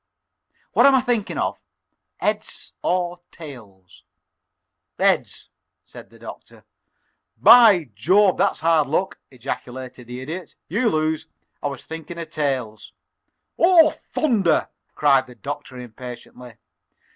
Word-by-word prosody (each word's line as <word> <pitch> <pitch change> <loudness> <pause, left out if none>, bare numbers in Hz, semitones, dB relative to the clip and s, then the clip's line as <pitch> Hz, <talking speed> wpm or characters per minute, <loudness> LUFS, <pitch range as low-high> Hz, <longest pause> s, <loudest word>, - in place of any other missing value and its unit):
What - - +6
am 275 - +6
I 260 - +4
thinking 240 -4 -1
of, - - -2 0.6
heads - - -3
or 175 -1 -1
tails?" 105 - -13 0.9
"Heads," - - 0 0.3
said - - -13
the - - -18
Doctor. - - -12 0.7
"By 210 - +7
Jove, 185 - +3
that's 195 +2 +1
hard 160 -3 +3
luck!" 180 +7 -1
ejaculated 125 0 -7
the 125 +1 -7
Idiot. 165 +7 -7
"You 225 +6 +1
lose. 155 -2 -1 0.3
I - - -1
was 140 -2 -7
thinking 160 +1 -8
of 165 -1 -7
tails." 130 -8 -3 0.7
"Oh, 335 -3 +6
thunder!" 210 - 0 0.3
cried 140 -3 +3
the 125 - -14
Doctor, 145 -1 -7
impatiently. 125 0 -10
155 Hz, 115 wpm, -22 LUFS, 125-190 Hz, 0.9 s, By